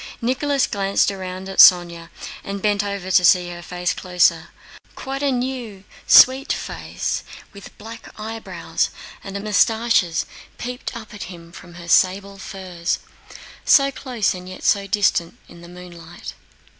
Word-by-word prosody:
Nicholas 270 +3 0
glanced 200 -1 0
round 185 -1 -7
at 195 - -6
Sónya, 170 -2 +6 0.3
and 200 0 -5
bent 205 0 +1
down 200 0 -4
to 185 +1 -6
see 180 0 +4
her 175 0 -8
face 180 +1 -3
closer. 175 -2 +1 0.5
Quite 270 +1 -5
a 285 -1 +1
new, 245 -6 -4 0.2
sweet 265 +2 +7
face - - -4 0.3
with 200 -2 -13
black 225 +1 -11
eyebrows 225 +1 -3 0.3
and 200 -1 -6
mustaches 215 -5 +2 0.3
peeped 250 0 -6
up 220 -2 -11
at 205 - -7
him 170 -2 -12
from 175 0 -13
her 170 -1 -11
sable 195 +3 +2
furs—so 190 - -2
close 250 -6 -2
and 180 0 -9
yet 185 - -10
so 200 -1 +2
distant—in 175 -4 -1
the 170 - -12
moonlight. 175 -1 -11
195 Hz, 135 wpm, -21 LUFS, 180-225 Hz, 0.5 s, sweet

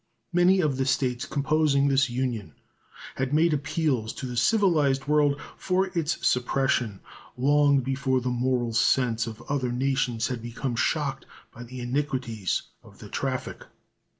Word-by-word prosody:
Many 180 +2 +4
of 145 -5 0
the 135 - 0
States 125 -2 0
composing 140 0 +2
this 135 -1 +3
Union 120 - -3 0.6
had 135 +2 0
made 165 +1 +4
appeals 150 -6 -1
to - - -6
the 125 -1 -5
civilized 145 - +2
world 145 -1 +2 0.2
for 190 +1 0
its 165 -2 -1
suppression 125 -4 0 0.4
long 140 +1 +4
before 130 0 0
the 125 0 -2
moral 125 -1 0
sense 115 0 +2
of 110 -1 -8
other 130 -3 -2
nations 125 -2 0
had 125 -3 -4
become 120 +2 -4
shocked 135 +1 -1 0.3
by 120 - -11
the 125 +1 -8
iniquities 125 - -2 0.2
of - - -18
the - - -11
traffic. - - -3
135 Hz, 145 wpm, -26 LUFS, 120-145 Hz, 0.6 s, Many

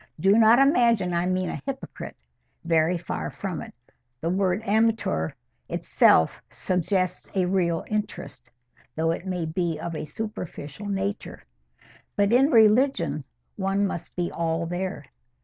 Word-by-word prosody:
Do 195 +5 +4
not 225 +1 +6
imagine 235 - +3
I 170 +1 +1
mean 185 0 0
a - - -6
hypocrite. 275 -1 -6 0.5
Very 165 +1 +2
far 80 - -4
from - - -5
it. - - -9 0.5
The 165 +4 -1
word 190 +2 0
amateur 220 - +1 0.4
itself 80 - +3
suggests 185 0 -1
a 185 -2 +2
real 175 -3 0
interest, 205 - -5 0.5
though 165 +1 +1
it 170 +3 -5
may 180 -3 -2
be 165 0 -2
of 170 -1 -5
a 155 - -4
superficial 180 -2 -6
nature. 200 +1 -3 0.7
But 205 +1 +2
in 270 +4 +5
religion 225 - +3 0.3
one 195 0 +1
must 175 -3 -5
be 175 -1 -2
all 165 0 -1
there. 175 -3 -4
185 Hz, 135 wpm, -25 LUFS, 165-210 Hz, 0.7 s, not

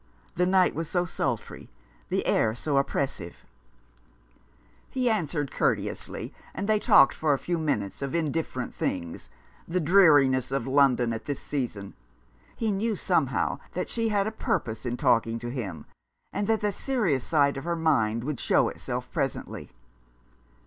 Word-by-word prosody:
The 180 0 +1
night 185 0 +4
was 165 0 -4
so 175 0 +1
sultry, 170 - -4 0.4
the - - 0
air 110 0 +2
so 140 +3 -1
oppressive! 135 -10 -2 1.4
He 250 -2 +1
answered 155 -8 -1
courteously, - - -2 0.2
and 200 - -3
they 215 -1 +3
talked 135 - +6
for 150 -2 +1
a - - -3
few 175 +4 -2
minutes 105 -11 -2
of 140 +3 -3
indifferent 155 -5 -2
things, 85 -2 -4 0.4
the 180 +2 0
dreariness 145 -8 +5
of 135 -3 -1
London 130 -3 +3
at 115 - -6
this 145 -2 -3
season. 115 -8 -4 0.6
He 225 -2 -1
knew 215 +3 0
somehow - - 0 0.2
that - - -2
she 230 -1 -1
had 200 -2 +1
a 220 - -2
purpose 115 - -2
in 120 0 -2
talking 115 -1 +2
to 120 +1 -5
him, 100 - -5 0.5
and 205 - -1
that 220 -1 +2
the 210 -1 +1
serious 200 - 0
side 145 -3 +2
of 135 - -5
her 170 +1 -1
mind 115 -9 +1
would 145 -1 -3
show - - +3
itself - - -5
presently. - - -3
145 Hz, 155 wpm, -27 LUFS, 125-180 Hz, 1.4 s, talked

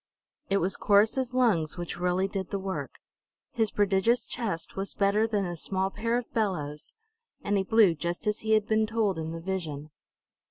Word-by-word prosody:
It 195 - +3
was 190 +1 0
Corrus's 225 +5 +3
lungs 185 -11 +2
which 175 0 -5
really 180 +2 +1
did 190 -2 -4
the 200 - -2
work. 195 -1 -4 0.6
His 225 -2 +1
prodigious 205 +4 +2
chest 195 -9 -4
was 195 +1 -4
better 205 +2 +2
than 205 -3 0
a 175 -1 -4
small 190 +3 -1
pair 230 +3 -1
of 245 - -6
bellows, 155 -9 -2 0.5
and 205 - 0
he 195 - +3
blew 205 -2 +4
just 170 +6 -4
as 210 0 0
he 220 0 0
had 215 -1 +3
been 220 0 +2
told 215 -5 0
in 160 0 -4
the 165 - -5
vision. 160 -5 -4
195 Hz, 185 wpm, -28 LUFS, 175-220 Hz, 0.6 s, blew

